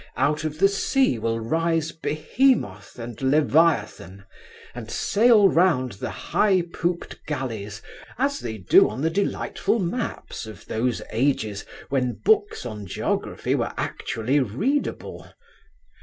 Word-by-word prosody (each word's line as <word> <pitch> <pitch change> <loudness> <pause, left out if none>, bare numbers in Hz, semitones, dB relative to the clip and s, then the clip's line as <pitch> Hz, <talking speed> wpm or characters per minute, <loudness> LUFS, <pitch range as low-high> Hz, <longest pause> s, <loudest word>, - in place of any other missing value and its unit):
Out 150 +2 +1
of 155 -1 -3
the 195 +4 +5
sea 200 - +1
will 115 +1 -1
rise 165 +6 0
Behemoth 155 - 0
and 120 0 -8
Leviathan, 135 - +1 0.5
and 115 -2 -8
sail 215 - +4
round 165 -9 +2
the 115 +4 -6
high 185 - +1
pooped 175 0 -3
galleys, 115 -8 -4 0.3
as 280 +3 0
they 110 -2 -5
do 95 -3 +5
on 115 +5 -6
the 160 - +1
delightful 200 +4 -1
maps 190 - -4
of 110 - -11
those 120 +2 -1
ages 110 -4 0 0.2
when 125 -3 0
books 420 - +1
on 105 -4 -6
geography - - -2
were - - -1
actually 120 +6 -1
readable. 145 - -2
140 Hz, 125 wpm, -24 LUFS, 115-180 Hz, 0.5 s, the